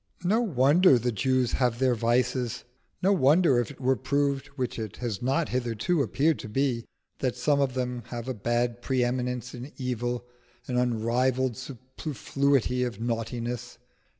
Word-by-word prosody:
No 210 +6 +3
wonder 150 - +5
the 120 +1 0
Jews 130 +2 +1
have 125 -3 +1
their 130 0 +3
vices: 120 +1 0 0.4
no 195 +2 +5
wonder 150 -4 +4
if 120 - -1
it 145 - -12
were 130 0 +2
proved 140 +1 0
(which 125 -4 -3
it 110 -3 -5
has 115 -6 -3
not 135 +6 +1
hitherto 125 +6 0
appeared 140 +6 +1
to 110 - -7
be) 125 0 0 0.3
that 130 -3 -1
some 145 -2 +2
of 130 -2 0
them 125 -1 -2
have 120 0 -6
a 130 - -1
bad 120 +2 -1
pre 130 0 +1
eminence 125 0 -2
in 125 +4 -8
evil, 120 -1 -2 0.4
an 125 - -2
unrivalled 125 +1 +1
superfluity 130 0 -1
of 120 -2 -4
naughtiness. 120 +1 -3
125 Hz, 155 wpm, -27 LUFS, 120-135 Hz, 0.4 s, wonder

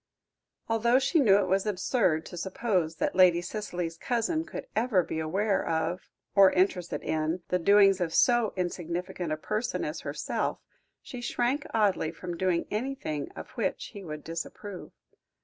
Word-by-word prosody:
Although 230 +2 +3
she 275 +5 +2
knew 205 -8 +6
it 200 -2 +1
was 190 +3 +1
absurd 185 -4 +1
to - - -9
suppose 185 -2 -1
that - - -1
Lady 180 -2 +6
Cicely's 175 -3 -4
cousin 250 +7 0
could - - -7
ever 220 -5 +2
be 160 - -4
aware 195 +6 0
of, 165 +2 -2 0.2
or 195 -2 +7
interested 180 -2 0
in, 160 +3 -1
the 180 - +1
doings 195 +1 +5
of 170 -2 0
so 240 +2 +3
insignificant 175 -1 -3
a 155 - 0
person 215 +9 -2
as - - -4
herself, - - -2 0.5
she 250 - -8
shrank 245 +3 -1
oddly 205 -7 +2
from 175 +1 -6
doing 175 -1 0
anything 210 - -3
of - - -9
which 230 -6 -2
he 200 -2 -8
would 150 -3 -7
disapprove. 175 +4 -7
190 Hz, 155 wpm, -28 LUFS, 170-220 Hz, 0.5 s, or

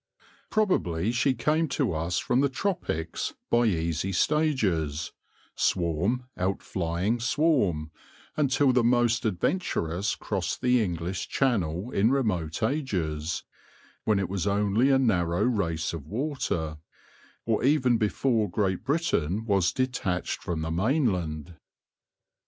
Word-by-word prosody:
Probably 110 - +1
she 130 +2 +2
came 155 +7 +1
to 130 - 0
us 80 +2 -1
from 125 +2 +1
the 140 - +2
tropics 135 - -2 0.2
by 120 0 +4
easy 85 -1 -1
stages, 95 - +1 0.4
swarm 90 +8 0 0.2
outflying 95 +2 -1
swarm, 115 - +1 0.4
until 135 -2 +3
the 125 -1 +3
most 120 0 +2
adventurous 95 - -1
crossed 95 -4 -3
the 125 -2 +3
English 85 -1 -3
Channel 105 - 0
in 105 +4 +3
remote 100 - 0
ages, 90 - -1 0.6
when 110 -2 +2
it 100 -2 0
was 95 +1 -2
only 105 +5 +2
a 135 - +5
narrow 90 -9 +1
race 85 -11 0
of 75 -4 -7
water, 100 - -2 0.7
or 115 -2 0
even 130 -4 +3
before 110 0 +1
Great 95 0 -1
Britain 110 - 0
was 95 -5 +2
de 130 - +1
tached 95 -8 -3
from 80 -3 -3
the 80 - -3
mainland. 90 - 0
100 Hz, 120 wpm, -27 LUFS, 85-125 Hz, 0.7 s, a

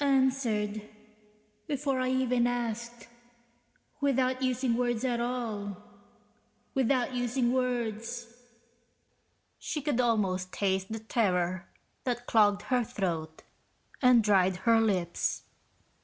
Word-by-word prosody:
(Answered... 255 -6 +1 0.9
before 275 -2 -1
I 255 0 0
even 250 -2 +2
asked... 235 0 -4 0.9
without 260 -2 +1
using 255 -2 +1
words 240 0 0
at 240 -2 0
all... 225 -5 -3 1.0
without 260 0 +1
using 245 0 0
words....) 235 -2 -2 1.3
She 305 - -3
could 280 -4 0
almost 190 -6 0
taste 190 0 -1
the 220 - -2
terror 185 -5 0 0.4
that 245 -1 -2
clogged 205 -3 +3
her 245 +3 +1
throat 165 -7 -3 0.6
and 250 -3 +6
dried 190 -3 +3
her 230 -1 +5
lips. 185 -6 0
235 Hz, 100 wpm, -29 LUFS, 210-255 Hz, 1.3 s, and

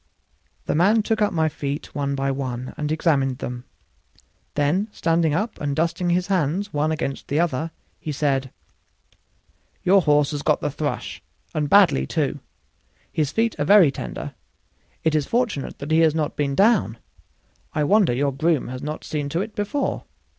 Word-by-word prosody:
The - - 0
man 205 +7 +4
took 220 0 0
up 210 - +3
my 160 -2 +1
feet 145 -1 -4
one 140 -1 -1
by 135 0 0
one 130 -2 -4
and 150 0 -3
examined 140 -5 +1
them; 125 0 -6 0.9
then 150 +8 +1
standing 165 -5 +1
up 210 +6 -2
and 145 -1 -1
dusting 170 +3 0
his 180 +1 +2
hands 190 +2 0
one 150 +2 +1
against 150 -3 -3
the 145 - 0
other, 165 -2 0 0.3
he 155 - -4
said: 135 -2 0 1.3
"Your 195 +2 +5
horse 150 -2 +3
has 145 -1 -3
got 150 0 +2
the 150 - -2
'thrush', 145 +1 -4 0.3
and 150 -1 -1
badly, 190 -9 +5
too; 145 -3 -1 0.7
his 150 -3 0
feet 225 0 +1
are 145 - +1
very 190 -5 +7
tender; - - -6 0.7
it 160 - +2
is 150 -3 +1
fortunate 230 - -1
that 140 +3 -6
he 160 - +4
has 160 -2 +4
not 155 -2 -1
been 140 -2 -1
down. 195 - +3 0.8
I 150 - +2
wonder 200 - +4
your 140 +3 0
groom 155 -1 +1
has 130 0 -6
not 150 +1 -5
seen 145 -2 -3
to 165 +5 -1
it 215 +1 -5
before. 205 +8 -2
155 Hz, 170 wpm, -23 LUFS, 140-180 Hz, 1.3 s, very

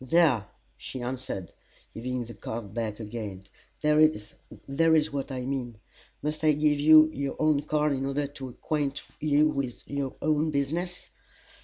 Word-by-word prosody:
"There!" 130 - +3 0.3
she 130 - -7
answered, 125 - -5 0.4
giving 125 +1 -3
the 120 - -9
card 110 -4 -6
back 110 -2 -3
again, 105 -4 -6 0.4
"there 150 0 +4
is 155 +4 +1
what 140 0 -3
I 130 -1 -3
mean! 125 -4 -3 0.5
Must 150 +1 -2
I 155 -1 +5
give 150 0 +2
you 155 +1 +8
your 140 0 -3
own 155 -2 +3
card 150 0 +1
in 135 0 -2
order 140 +1 0
to 140 -2 -7
acquaint 145 +2 -2 0.2
you 150 0 +4
with 140 -5 -3
your 140 -2 -3
own 155 +1 +2
business?" 160 +5 -2
140 Hz, 150 wpm, -28 LUFS, 125-150 Hz, 0.5 s, you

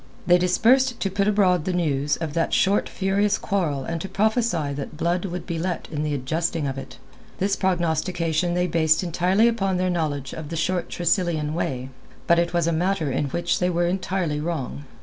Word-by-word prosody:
They 175 0 +5
dispersed 235 +8 +3
to 195 - 0
put 200 +1 0
abroad 190 -5 +3
the 185 - -1
news 145 -5 0
of 160 -3 -4
that 165 0 +1
short 195 +2 +2
furious 200 +2 +1
quarrel 160 -9 -1
and 165 +3 -4
to 195 - -5
prophesy 210 - +1
that 145 +2 -6
blood 175 +3 0
would 180 -2 -5
be 170 -3 -3
let 180 +1 -3
in 150 -2 -2
the 150 -1 -1
adjusting 160 +4 -1
of 135 -1 -2
it. - - -10 0.4
This 195 +1 +1
prognostication 175 -1 0
the 180 - +1
they 180 - +1
based 160 0 +2
entirely 180 +5 +2
upon 195 -5 0
their 185 0 +1
knowledge 145 -6 -2
of 155 -2 -7
the 165 - -4
short 175 +2 -1
Tressilian 170 -3 0
way. 130 -6 -3 0.4
But 170 0 +4
it 170 0 0
was 170 -2 +1
a 170 - +1
matter 165 -3 0
in 135 - 0
which 170 +5 -1
they 180 - +1
were 175 0 +1
entirely 180 -3 -1
wrong. 150 -3 -4
175 Hz, 200 wpm, -24 LUFS, 155-185 Hz, 0.4 s, They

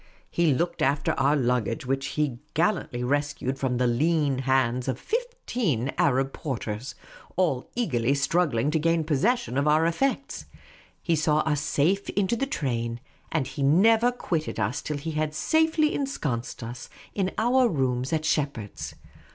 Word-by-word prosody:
He 170 -3 +3
looked 170 +6 -1
after 140 +1 +2
our 140 +2 +2
luggage, 125 -4 0
which 135 +1 -1
he 145 -6 0 0.2
gallantly 165 -8 0
rescued 140 0 -1
from 130 -3 0
the 125 - +2
lean 145 +2 +2
hands 130 -2 +1
of 130 -1 -2
fifteen 245 - -2
Arab 135 0 +2
porters, 125 -2 -4 0.4
all 165 -9 0
eagerly 140 - +1
struggling 140 -3 +1
to 160 - +1
gain 165 +1 +2
possession 165 - +1
of 140 - +1
our 155 +2 +4
effects; 270 +11 -1 0.6
he 170 - +2
saw 155 0 +2
us 150 -2 0
safe 180 +8 +1
into 200 +2 +1
the 270 +4 -1
train; 120 - -2 0.3
and 155 -4 0
he 140 +2 -6
never 220 - +5
quitted 165 - -3
us 110 +8 -1
till 150 - -3
he 160 +3 -4
had 155 0 -2
safely 315 - +2
ensconced 140 - -3
us 120 +2 -7 0.2
in 190 -2 0
our 245 +2 +3
rooms 130 - 0
at 155 -1 0
Shepheard's. 140 -10 -2
150 Hz, 150 wpm, -26 LUFS, 130-175 Hz, 0.6 s, never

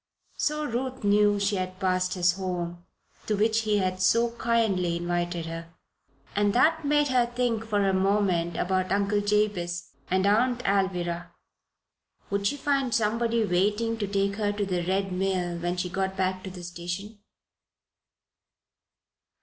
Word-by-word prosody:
So 300 0 0
Ruth 255 -1 -3
knew 205 0 +4
she 200 0 +1
had 185 0 -4
passed 185 0 0
his 175 -1 +3
home, 175 -2 -4 0.4
to 215 - +1
which 220 +2 +2
he 215 -2 +1
had 185 -1 -1
so 230 +5 +3
kindly 200 -7 +1
invited 175 -1 -2
her. 165 0 -7 0.6
And 205 0 +2
that 320 +6 +3
made 295 0 +2
her 250 -2 +3
think 240 -2 -1
for 205 -2 +1
a 190 - +2
moment 190 -3 +1
about 185 0 0
Uncle 200 +1 +1
Jabez 205 -4 0 0.2
and 185 +1 +2
Aunt 240 +4 +2
Alvirah. 180 -3 0 1.0
Would 200 0 +1
she 285 - -1
find 275 -3 0
somebody 230 +1 +1
waiting 210 +5 +1
to 205 - -1
take 200 0 0
her 205 -2 +1
to 205 0 -2
the 180 -2 -1
Red 195 +1 0
Mill 180 -2 -1
when 175 +1 -2
she 180 - -1
got 190 +1 -2
back 185 0 0
to - - -5
the 180 -1 -9
station? 175 +5 -6
195 Hz, 150 wpm, -27 LUFS, 180-220 Hz, 1.0 s, knew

